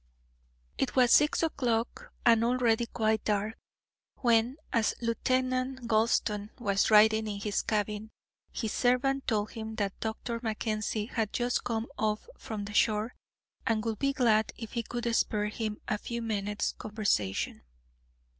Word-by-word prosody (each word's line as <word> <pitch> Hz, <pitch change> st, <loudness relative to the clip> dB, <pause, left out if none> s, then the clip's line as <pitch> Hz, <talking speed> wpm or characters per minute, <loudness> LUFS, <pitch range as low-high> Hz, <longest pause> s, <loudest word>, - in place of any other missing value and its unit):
It 255 Hz, -, 0 dB
was 250 Hz, -2 st, +5 dB
six 295 Hz, +2 st, +5 dB
o'clock, 240 Hz, -7 st, -1 dB
and 230 Hz, -1 st, +6 dB
already 235 Hz, -1 st, +2 dB
quite 220 Hz, -2 st, 0 dB
dark, 210 Hz, +1 st, 0 dB, 0.6 s
when, 235 Hz, +1 st, +2 dB, 0.2 s
as 230 Hz, -2 st, +2 dB
Lieutenant 255 Hz, +1 st, 0 dB
Gulston 215 Hz, -2 st, +1 dB
was 200 Hz, -3 st, +1 dB
writing 220 Hz, 0 st, +6 dB
in 205 Hz, -1 st, -4 dB
his 205 Hz, 0 st, -1 dB
cabin, 210 Hz, 0 st, -2 dB, 0.4 s
his 220 Hz, -4 st, -3 dB
servant 270 Hz, +2 st, +1 dB
told 215 Hz, -2 st, 0 dB
him 220 Hz, -1 st, -6 dB
that 200 Hz, -4 st, -2 dB
Dr. 230 Hz, +1 st, -3 dB
Mackenzie 215 Hz, -2 st, -2 dB
had 220 Hz, -3 st, -2 dB
just 245 Hz, 0 st, 0 dB
come 230 Hz, -2 st, -1 dB
off 215 Hz, -, 0 dB
from 210 Hz, -2 st, -6 dB
the 205 Hz, -, -7 dB
shore, 215 Hz, +2 st, +2 dB, 0.5 s
and 225 Hz, -1 st, +1 dB
would 225 Hz, -2 st, -2 dB
be 275 Hz, 0 st, +2 dB
glad 225 Hz, -5 st, +2 dB
if 225 Hz, -2 st, -7 dB
he 235 Hz, -, 0 dB
could 240 Hz, +1 st, -5 dB
spare 210 Hz, -1 st, +1 dB
him 215 Hz, -1 st, -4 dB
a 210 Hz, -, -1 dB
few 235 Hz, +1 st, -4 dB
minutes' 205 Hz, -2 st, -1 dB
conversation. 205 Hz, -, -1 dB
220 Hz, 145 wpm, -30 LUFS, 210-240 Hz, 0.6 s, and